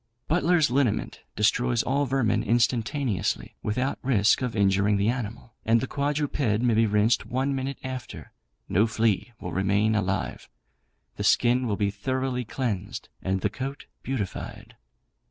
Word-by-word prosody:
'Butler's 170 -2 +3
Liniment' 130 -5 0 0.2
destroys 120 +2 +2
all 140 +2 0
vermin 130 -3 +1
instantaneously, 120 -2 0
without 125 +6 -1
risk 115 -4 +3
of 125 -3 -2
injuring 100 0 +3
the 100 +2 +2
animal; 120 -1 -4
and 115 +1 +3
the 130 - -2
quadruped 145 +2 -2
may 115 -2 +2
be 110 +1 +3
rinsed 110 +2 +2
one 130 +3 0
minute 135 0 -3
after. 130 -1 -7 0.4
No 105 +5 +3
flea 110 0 0
will 90 - -6
remain 100 +4 +2
alive; 100 -3 -2 0.7
the - - -3
skin 125 +1 +3
will 105 -3 -1
be 100 -1 +1
thoroughly 130 +4 -2
cleansed, 105 -5 -4
and 95 0 -1
the - - +1
coat 135 +2 -5 0.2
beautified. 120 -8 -5
120 Hz, 140 wpm, -26 LUFS, 105-130 Hz, 0.7 s, Butler's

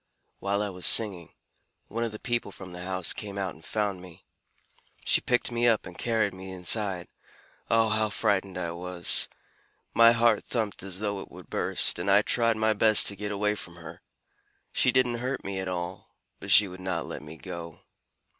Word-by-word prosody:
While 100 +1 -1
I 100 - -3
was 90 -1 0
singing, 95 -7 +2 0.6
one 115 +2 -3
of 115 - -2
the 110 - -7
people 120 -3 -3
from 95 -2 -10
the 90 - -8
house 90 -1 0
came 100 -1 -7
out 95 -3 -2
and 80 - -18
found 100 -2 -2
me. 90 -2 -14 0.8
She - - +3
picked 125 0 +1
me 120 0 +1
up 115 -2 +2
and 90 - -10
carried 110 -3 0
me 95 0 -9
inside. 95 0 +1 0.6
Oh, 115 -1 +3
how 110 0 +1
frightened 95 -2 0
I 85 -2 -3
was! 85 0 +1 0.7
My 115 0 +7
heart 115 -2 +3
thumped 110 -5 -3
as 95 0 -5
though 100 -2 -2
it - - -10
would - - -14
burst, - - +3
and - - -2
I 100 +2 +5
tried 115 0 +1
my 110 0 +2
best 110 +1 +6
to 100 - -5
get 105 +1 -5
away 105 +1 0
from 90 -4 -7
her. 85 -1 -11 0.7
She 125 - +3
didn't 125 -2 +1
hurt 130 +2 -3
me 95 -1 -4
at 95 - -4
all, 90 0 -6 0.2
but 100 - -9
she 100 +1 +7
would 90 0 -10
not 95 -2 -3
let - - -7
me 75 +2 -11
go. 85 -3 -9
100 Hz, 195 wpm, -27 LUFS, 90-110 Hz, 0.8 s, My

